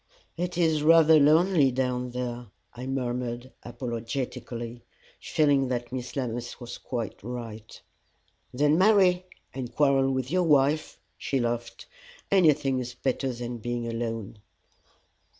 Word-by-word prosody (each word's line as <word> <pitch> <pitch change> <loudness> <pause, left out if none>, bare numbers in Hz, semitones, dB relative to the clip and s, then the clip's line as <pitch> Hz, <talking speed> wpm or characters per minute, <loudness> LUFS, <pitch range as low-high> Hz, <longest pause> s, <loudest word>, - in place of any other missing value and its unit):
"It 175 +1 -3
is 160 -3 +2
rather 160 0 +6
lonely 155 0 +4
down 125 -1 -1
there," 120 -1 -5 0.3
I 125 +1 -7
murmured, 125 -1 -3
apologetically, 120 0 -5 0.4
feeling 145 -3 +2
that 120 -1 -3
Miss 125 -1 -5
Lammas 120 -3 -4
was 120 -1 -8
quite 120 -4 -5
right. 115 -2 -8 0.7
"Then 145 +5 +2
marry, 185 -3 +4 0.3
and 130 -3 -5
quarrel 135 -2 +3
with 130 0 -2
your 185 +1 +2
wife," 150 -1 +2 0.2
she 135 - -1
laughed. 120 -1 -3 0.5
"Anything 150 -8 +3
is 125 -1 -6
better 130 +1 -1
than 120 0 -6
being 120 +1 -3
alone." 115 -2 -4
130 Hz, 120 wpm, -27 LUFS, 120-150 Hz, 0.7 s, rather